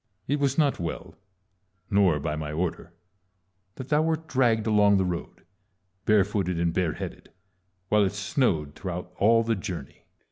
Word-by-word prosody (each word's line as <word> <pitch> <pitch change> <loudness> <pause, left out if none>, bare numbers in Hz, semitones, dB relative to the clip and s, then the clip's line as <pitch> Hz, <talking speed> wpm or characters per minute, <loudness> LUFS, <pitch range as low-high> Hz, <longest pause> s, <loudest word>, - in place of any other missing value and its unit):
It 145 +2 0
was 140 -1 +1
not 145 -3 +2
well, 85 -1 -5 0.8
nor 95 -6 +4
by 75 +1 -2
my 75 -1 -4
order, 85 +2 -3 0.8
that 130 -1 -8
thou 150 0 +3
wert 160 0 -1
dragged 120 -6 +2
along 105 -2 +4
the 95 - +1
road, 90 -2 -5 0.6
barefooted 100 -4 +2
and 85 -1 +1
bareheaded, 90 -3 -3 0.6
while 105 0 +4
it 95 - -1
snowed 100 - 0
throughout 90 0 -6
all 115 +3 +5
the 115 0 +1
journey. 90 -9 -6
100 Hz, 145 wpm, -26 LUFS, 85-115 Hz, 0.8 s, all